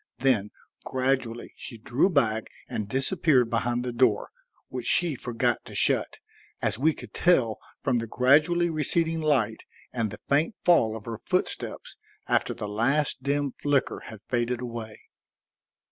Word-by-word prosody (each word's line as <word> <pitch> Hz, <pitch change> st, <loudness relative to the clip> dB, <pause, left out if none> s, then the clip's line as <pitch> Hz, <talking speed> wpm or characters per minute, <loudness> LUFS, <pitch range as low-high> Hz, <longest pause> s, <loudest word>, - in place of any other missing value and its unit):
Then 125 Hz, -6 st, +2 dB, 0.3 s
gradually 130 Hz, -3 st, -1 dB
she 115 Hz, -, -9 dB
drew 120 Hz, -, +1 dB
back 115 Hz, -, +1 dB, 0.2 s
and 105 Hz, -2 st, -4 dB
disappeared 135 Hz, -, +2 dB
behind 120 Hz, +1 st, 0 dB
the 125 Hz, -, -2 dB
door, 130 Hz, +2 st, +2 dB, 0.4 s
which -, -, -5 dB
she 175 Hz, -3 st, +3 dB
forgot 120 Hz, -1 st, -1 dB
to -, -, -10 dB
shut, -, -, +1 dB, 0.4 s
as 110 Hz, -, -1 dB
we 155 Hz, +3 st, +3 dB
could -, -, -11 dB
tell 130 Hz, -11 st, +3 dB, 0.2 s
from 130 Hz, -4 st, +1 dB
the 115 Hz, -, -4 dB
gradually 155 Hz, +9 st, +3 dB
receding 160 Hz, +1 st, 0 dB
light 130 Hz, -8 st, +1 dB, 0.3 s
and 115 Hz, -3 st, -1 dB
the -, -, -9 dB
faint 150 Hz, +8 st, +2 dB
fall 115 Hz, -11 st, +4 dB
of 105 Hz, -, -12 dB
her 115 Hz, -2 st, -5 dB
footsteps -, -, -2 dB, 0.3 s
after -, -, +1 dB
the 105 Hz, -, -5 dB
last 130 Hz, +8 st, 0 dB
dim 140 Hz, +1 st, 0 dB
flicker 145 Hz, 0 st, 0 dB
had 110 Hz, -2 st, -10 dB
faded 120 Hz, 0 st, 0 dB
away. 115 Hz, -3 st, -6 dB
125 Hz, 145 wpm, -27 LUFS, 115-145 Hz, 0.4 s, fall